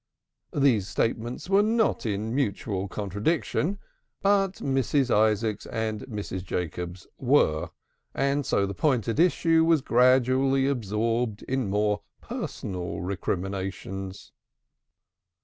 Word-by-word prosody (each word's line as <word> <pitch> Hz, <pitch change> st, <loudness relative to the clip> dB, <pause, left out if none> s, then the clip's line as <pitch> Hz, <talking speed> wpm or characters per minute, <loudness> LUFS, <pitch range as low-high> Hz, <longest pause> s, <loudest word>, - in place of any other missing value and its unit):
These 125 Hz, -9 st, +3 dB
statements 115 Hz, -, -2 dB
were 195 Hz, +1 st, +5 dB
not 220 Hz, -, +1 dB
in 105 Hz, +2 st, -2 dB
mutual 100 Hz, -6 st, -1 dB
contradiction, 110 Hz, -, -1 dB, 0.5 s
but 195 Hz, -1 st, +3 dB
Mrs. 135 Hz, -, 0 dB
Isaacs 110 Hz, 0 st, +1 dB
and 110 Hz, -1 st, -2 dB
Mrs. 105 Hz, -5 st, -5 dB
Jacobs 90 Hz, +1 st, -4 dB
were, 120 Hz, -, +2 dB, 0.5 s
and 140 Hz, +1 st, +1 dB
so 100 Hz, -, +1 dB
the 100 Hz, -, -4 dB
point 125 Hz, -, +1 dB
at 115 Hz, +5 st, -1 dB
issue 165 Hz, -2 st, +4 dB
was 165 Hz, -3 st, +4 dB
gradually 130 Hz, +2 st, +3 dB
absorbed 115 Hz, -2 st, -1 dB
in 130 Hz, -5 st, -1 dB
more 105 Hz, +1 st, +1 dB, 0.2 s
personal 90 Hz, -3 st, -5 dB
recriminations. 95 Hz, +1 st, -4 dB
115 Hz, 105 wpm, -27 LUFS, 100-135 Hz, 0.5 s, were